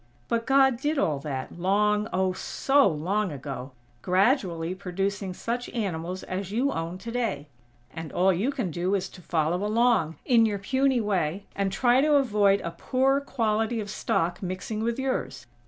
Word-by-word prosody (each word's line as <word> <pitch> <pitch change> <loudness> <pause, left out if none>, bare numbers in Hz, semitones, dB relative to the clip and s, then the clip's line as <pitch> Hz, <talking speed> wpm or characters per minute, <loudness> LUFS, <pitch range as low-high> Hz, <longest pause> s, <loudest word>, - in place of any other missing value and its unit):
But 230 0 -1
God 270 -2 +4
did 295 +4 -1
all 150 - +1
that, 140 +3 -5
long, 210 +3 +2
oh, 185 0 +1
so 275 +8 +2
long 185 +4 -1
ago; 135 -2 -6 0.3
gradually 185 - +1
producing 195 +1 -3
such 235 +6 -4
animals 185 -4 -3
as 190 +1 -4
you 255 +6 +1
own 165 -1 -4
today; 225 -9 -3 0.4
and 160 -1 -7
all 190 +2 +3
you 200 +10 0
can 250 - -3
do 180 +5 0
is 195 -1 -1
to 185 - -14
follow 170 +2 0
along, 215 -7 +2
in 230 -3 +5
your 205 -2 -1
puny 260 +5 +1
way, 195 -2 -1
and 195 -1 0
try 245 +6 +3
to 300 +1 +4
avoid 210 -7 +3
a 170 - -4
poor 265 +10 +1
quality 225 -4 0
of 205 -2 -5
stock 175 -4 -1
mixing 185 +3 -4
with 230 +1 -1
yours. 265 - -3
200 Hz, 165 wpm, -26 LUFS, 175-235 Hz, 0.4 s, in